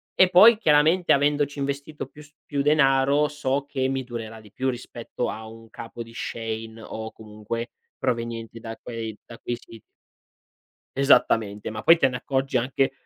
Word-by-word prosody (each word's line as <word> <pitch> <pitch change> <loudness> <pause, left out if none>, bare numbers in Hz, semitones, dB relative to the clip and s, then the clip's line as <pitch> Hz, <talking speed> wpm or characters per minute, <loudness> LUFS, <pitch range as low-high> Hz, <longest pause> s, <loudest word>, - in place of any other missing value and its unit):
e 185 - +6
poi, 210 +5 +8
chiaramente, 160 0 +4
avendoci 145 0 +2
investito 140 +2 -4
più 145 +3 -15
s 150 0 -18
più 140 -1 -1
denaro 140 0 +3
so 140 -1 -2
che 130 -2 -1
mi 135 0 -2
durerà 115 -2 -7
di 105 -2 -17
più 130 +1 -1
rispetto 120 -1 -5
a 110 0 -6
un 115 0 -13
capo 115 0 -8
di 115 0 -15
Shein 115 -1 -5
o 110 0 -6
comunque 110 +2 -6 0.3
provenienti 115 -2 -3
da 115 0 -7
quei 115 -3 -6
da 115 - -12
quei 120 - -3
siti. 115 -2 -14 1.2
Esattamente, 110 -7 +3
ma 110 0 -6
poi 165 - +7
te - - +4
ne 125 - -4
accorgi 135 +1 -1
anche 130 +2 +1
130 Hz, 165 wpm, -25 LUFS, 115-145 Hz, 1.2 s, poi